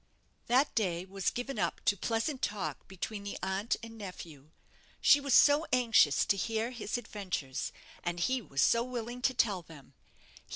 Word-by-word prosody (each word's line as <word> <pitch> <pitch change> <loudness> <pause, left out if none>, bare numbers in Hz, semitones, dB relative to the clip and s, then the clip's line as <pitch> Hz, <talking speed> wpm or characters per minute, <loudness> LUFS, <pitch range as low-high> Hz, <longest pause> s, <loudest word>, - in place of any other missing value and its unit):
That 255 +5 +3
day 180 -5 0
was 195 0 -1
given 255 +3 -4
up - - -1
to 205 - +4
pleasant 230 - -2
talk 180 -9 -3
between 200 +2 -5
the 200 - -5
aunt 190 +4 0
and 225 -1 -9
nephew. 165 -7 -9 0.5
She 285 - +6
was 280 -2 +2
so 295 +3 +6
anxious 230 - +4
to 200 - +2
hear 225 +4 -1
his 235 -2 -3
adventures, 190 - -4 0.3
and 175 0 -2
he 255 +8 +1
was 140 - 0
so 230 0 +4
willing 245 0 -5
to 260 0 +1
tell 205 -6 +2
them. 145 -5 -15
215 Hz, 165 wpm, -31 LUFS, 180-245 Hz, 0.5 s, She